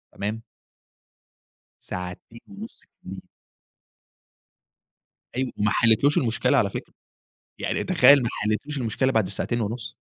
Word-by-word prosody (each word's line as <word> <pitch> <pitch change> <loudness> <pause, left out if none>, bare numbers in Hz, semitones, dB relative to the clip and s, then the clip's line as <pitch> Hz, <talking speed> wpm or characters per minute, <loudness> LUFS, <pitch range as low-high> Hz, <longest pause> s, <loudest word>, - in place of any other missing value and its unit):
تمام؟ 105 +3 -4 1.4
ساعتين 90 +5 -7
ونُص 205 +3 -10
كاملين. 95 +1 -12 2.1
أيوه، 130 0 -1
ما 105 0 +1
حليتلهوش 115 +7 +3
المشكلة 125 +3 +1
على 100 -6 +2
فكرة. - - -7 0.7
يعني - - -2
تخيل 140 -3 +6
ما 115 - -1
حليتلهوش 110 +8 -2
المشكلة 130 +2 0
بعد 110 -4 +2
الساعتين 120 +4 -2
ونُص. 110 +2 -4
115 Hz, 105 wpm, -24 LUFS, 105-130 Hz, 2.1 s, تخيل